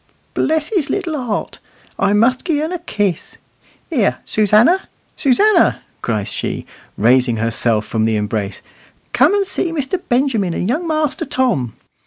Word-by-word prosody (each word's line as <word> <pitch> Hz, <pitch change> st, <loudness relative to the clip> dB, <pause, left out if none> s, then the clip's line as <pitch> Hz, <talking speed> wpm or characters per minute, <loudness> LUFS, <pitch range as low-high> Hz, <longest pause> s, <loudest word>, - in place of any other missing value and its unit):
"Bless 315 Hz, -1 st, +1 dB
his 360 Hz, -10 st, 0 dB
little 330 Hz, -9 st, -2 dB
heart! 210 Hz, -, -3 dB, 0.4 s
I -, -, +2 dB
must 235 Hz, +5 st, +3 dB
gi' 320 Hz, -5 st, 0 dB
un 310 Hz, +3 st, -2 dB
a 360 Hz, -, -3 dB
kiss. 205 Hz, -, -2 dB, 0.5 s
Here, 240 Hz, -11 st, +1 dB
Susannah, 215 Hz, -, +3 dB, 0.3 s
Susannah!" 405 Hz, -, +3 dB, 0.2 s
cries 105 Hz, -4 st, -2 dB
she, -, -, -3 dB, 0.3 s
raising 120 Hz, +1 st, +3 dB
herself 115 Hz, -1 st, 0 dB
from 110 Hz, -1 st, 0 dB
the 110 Hz, 0 st, +1 dB
embrace, 105 Hz, -2 st, -3 dB, 0.5 s
"come 290 Hz, +10 st, +4 dB
and 400 Hz, -1 st, +1 dB
see 375 Hz, -2 st, -1 dB
Mr. 330 Hz, +3 st, -2 dB
Benjamin 240 Hz, -8 st, +1 dB
and 180 Hz, -, -2 dB
young 315 Hz, +9 st, -1 dB
Master 310 Hz, -3 st, 0 dB
Tom. 250 Hz, -, 0 dB
245 Hz, 145 wpm, -18 LUFS, -, 0.5 s, come